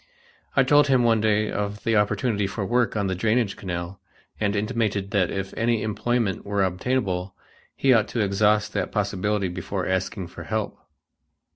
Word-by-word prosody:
I 135 - +5
told 145 +2 +5
him 130 -3 +4
one 115 -2 +3
day 110 0 +2
of 105 0 -3
the 115 -2 +1
opportunity 105 0 +1
for 100 +1 -4
work 120 +2 +1
on 100 - 0
the 95 - 0
drainage 110 +2 +1
canal 90 0 -5 0.4
and 105 -1 0
intimated 105 -2 -1
that 95 -4 +2
if 95 0 -4
any 115 0 +1
employment 110 -1 -1
were 100 -1 0
obtainable, 95 -1 -1 0.4
he 135 -1 +4
ought 110 -3 +3
to 120 - -4
exhaust 105 +1 +2
that - - -2
possibility 105 0 0
before 90 +1 -4
asking 95 0 -2
for - - -10
help. 110 -1 -2
105 Hz, 165 wpm, -24 LUFS, 95-115 Hz, 0.4 s, I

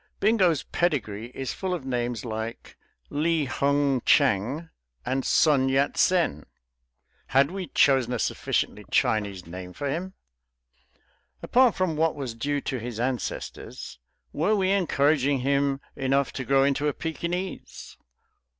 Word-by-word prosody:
Bingo's 190 -8 +3
pedigree 115 - -1
is 135 -1 -3
full 185 -2 -2
of 150 -7 -7
names 120 -3 -2
like 110 0 -6 0.4
Li 160 +1 +1
Hung 140 0 +1
Chang 140 - +2 0.4
and 130 +1 -1
Sun 140 -4 +3
Yat 135 +2 +1
Sen; 170 - +2 0.8
had 135 +4 +3
we 190 -2 -5
chosen 130 -3 +3
a 125 - 0
sufficiently - - -1
Chinese 100 -4 0
name 90 +2 -8
for 145 - -4
him? 175 +7 -3 1.3
Apart 250 -2 +4
from 185 -4 0
what 160 0 +1
was 135 -5 -5
due 145 +5 -2
to 130 -2 -3
his 115 -1 -6
ancestors, 120 - -4 0.3
were 195 +9 +2
we 190 -2 +1
encouraging 145 -7 +2
him 140 +1 +1 0.2
enough 135 +1 0
to 130 - -4
grow 135 +1 +4
into 140 +1 +1
a 145 - +1
Pekinese? 175 +3 -5
140 Hz, 130 wpm, -26 LUFS, 125-160 Hz, 1.3 s, Apart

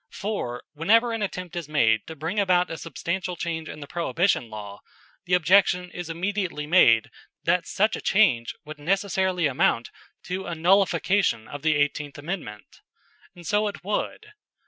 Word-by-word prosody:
For, 195 - -4
whenever 225 +10 +3
an 225 - -3
attempt 180 -4 -4
is 170 -4 -5
made 110 -8 +2
to 160 - -7
bring 165 +7 -3
about 180 -3 +2
a 165 - -4
substantial 175 +3 -4
change 165 -2 -4
in 150 - -8
the 145 - -8
Prohibition 170 - 0
law, 105 -2 -8 0.5
the 180 0 +3
objection 180 0 +3
is 175 -2 -7
immediately 180 -2 -2
made 120 -9 +5 0.3
that 170 0 +1
such 215 +2 +1
a - - -6
change 130 - +2
would 155 0 -9
necessarily 190 +1 0
amount 125 -4 +1 0.3
to 185 +1 -4
a 170 - -3
nullification 190 - +2
of 145 - -8
the 155 0 +2
Eighteenth 145 0 -1
Amendment. 145 - -7 0.5
And 175 -1 -13
so 210 +3 +1
it 205 - -6
would. 210 - -3
175 Hz, 160 wpm, -25 LUFS, 150-195 Hz, 0.5 s, made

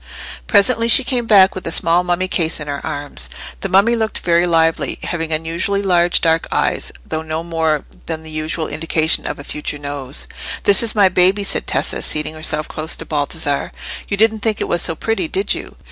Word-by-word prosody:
Presently 230 +2 +4
she 235 +3 +6
came 245 -2 -2
back 195 -3 +6
with 185 - -7
the - - -4
small 170 +2 +2
mummy 180 +1 0
case 165 -3 0
in 150 - -6
her 140 -1 -4
arms. 145 - -2 0.3
The 195 - -4
mummy 200 +6 +4
looked 220 -1 -1
very 170 0 +2
lively, 165 -1 +1
having 165 -2 -3
unusually 165 +6 -1
large 175 -2 +2
dark 165 0 +2
eyes, - - 0
though 155 - -3
no 160 +1 -4
more 160 -3 -1 0.2
than 160 -1 -4
the 160 - -9
usual 155 +1 -2
indication 160 +1 +1
of - - -4
a 145 - -9
future 150 0 -5
nose. 140 -2 -5 0.4
"This 200 - +4
is 230 -2 -1
my 205 -2 +5
baby," 185 +2 +3
said - - 0
Tessa, - - 0
seating 150 0 0
herself 155 -1 -1
close 155 +1 -2
to - - -8
Baldassarre. 145 -1 -2 0.3
"You 200 - -2
didn't 220 +1 +3
think 215 0 -1
it - - -2
was 175 - +1
so 165 - +2
pretty, 225 - -2
did 385 +5 0
you? - - -7
165 Hz, 200 wpm, -18 LUFS, 155-200 Hz, 0.4 s, she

